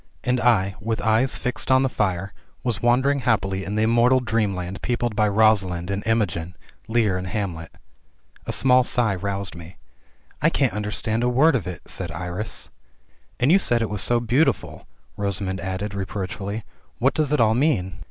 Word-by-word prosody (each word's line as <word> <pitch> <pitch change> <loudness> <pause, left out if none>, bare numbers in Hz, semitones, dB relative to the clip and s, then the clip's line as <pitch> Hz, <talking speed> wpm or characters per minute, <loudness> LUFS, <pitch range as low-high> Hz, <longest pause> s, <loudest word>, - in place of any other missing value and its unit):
And 125 0 +1
I, 100 -5 +3
with 115 +1 -2
eyes 115 +4 +2
fixed 125 +1 -3
on 130 0 +5
the - - +2
fire, 95 -5 -2 0.3
was 120 -7 -1
wandering 130 +4 +3
happily 100 -6 0
in 100 +2 -4
the 110 - +2
immortal 120 +3 +4
dreamland 100 -6 -2
peopled 120 -2 -1
by 105 0 +3
Rosalind 100 -4 +2
and 100 0 -2
Imogen, 90 -6 0 0.3
Lear 110 -5 +1
and 90 - -5
Hamlet. 90 -5 -4 0.8
A - - -1
small 130 -1 +4
sigh 120 -4 +1
roused 100 0 -3
me 85 +2 -11 0.3
— - - -34
"I - - +4
can't - - +1
understand 105 +2 -2
a 125 - +2
word 135 +5 +4
of 105 -9 -2
it," 90 -4 -7
said 90 -3 -2
Iris. 90 +6 -5 0.7
"And 130 +5 +3
you 195 - +6
said 120 -10 +1
it 110 - -3
was 105 -2 -3
so 120 -1 +2
beautiful," 120 +7 0 0.3
Rosamund 100 -1 -2
added, 95 +2 -4
reproach 95 -1 -4
fully. 100 +3 -5 0.3
"What 130 +3 +2
does 150 -2 0
it 150 - +2
all 110 -1 +4
mean?" 110 - 0
105 Hz, 180 wpm, -23 LUFS, 95-120 Hz, 0.8 s, you